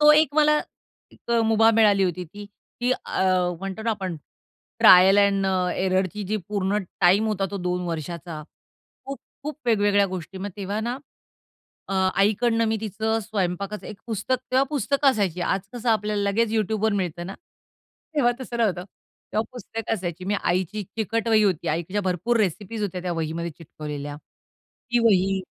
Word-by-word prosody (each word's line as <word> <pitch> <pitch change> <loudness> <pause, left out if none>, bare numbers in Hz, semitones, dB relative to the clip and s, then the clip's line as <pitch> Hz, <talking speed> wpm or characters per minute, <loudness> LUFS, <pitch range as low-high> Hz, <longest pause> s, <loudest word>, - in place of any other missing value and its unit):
तो 300 0 +8
एक 300 -1 +4
मला, 300 0 +4 0.5
एक - - -12
अ, 235 - +3
मुभा 225 0 +5
मिळाली 205 -3 +5
होती 180 0 -2
ती, 205 +6 -11 0.4
की 250 +1 +2
अ, 190 - -2 0.4
म्हणतो 195 +2 -5
ना 230 - 0
आपण, 190 -6 -3 0.6
ट्रायल 185 +2 +8
एंड 200 -1 +3
अ, 185 -1 +1
एररची 190 +2 0
जी 215 - +2
पूर्ण 200 0 0 0.2
टाईम 190 +5 +5
होता 200 -3 0
तो 200 - -4
2 180 0 -1
वर्षाचा, 165 -1 -5 0.6
खूप, 275 0 -6 0.2
खूप 300 +1 -5
वेगवेगळ्या 205 -3 +3
गोष्टी. 185 0 -6
मग 200 +1 -4
तेव्हा 200 +1 -3
ना, 240 +3 -3 0.9
अ, 195 - -2 0.2
आईकडनं 225 +3 +2
मी 220 - +1
तिचं 220 +1 -1
स्वयंपाकाचं 200 -1 -3
एक 210 - -8
पुस्तक 230 +3 -1
तेव्हा 260 +1 +4
पुस्तकं 280 -1 +2
असायची. 190 -7 -1
आज 190 +2 0
कसं 240 0 -4
आपल्याला 210 -1 0
लगेच 225 +2 +1
YouTubeवर 220 0 +1
मिळत 175 -4 -2
ना? 195 - -6 0.8
तेव्हा 245 -5 +3
तसं 240 -2 -5
नव्हतं. 190 -6 +1 0.5
तेव्हा 215 - +2
पुस्तकं 225 -1 -4
असायची. 180 -2 -5
मी 200 +2 0
आईची 185 +3 0
एक 205 - -4
चिकट 225 +1 -1
वही 220 -1 +5
होती. 190 -6 +1
आईच्या 170 +6 -1
भरपूर 190 +6 0
रेसिपीज 210 +2 -1
होत्या 185 -3 -3
त्या 180 - -2
वहीमध्ये 165 +1 -3
चिकटवलेल्या. 150 -2 -7 0.7
ती 240 - +3
वही 195 -3 +3
205 Hz, 165 wpm, -24 LUFS, 185-225 Hz, 0.9 s, तो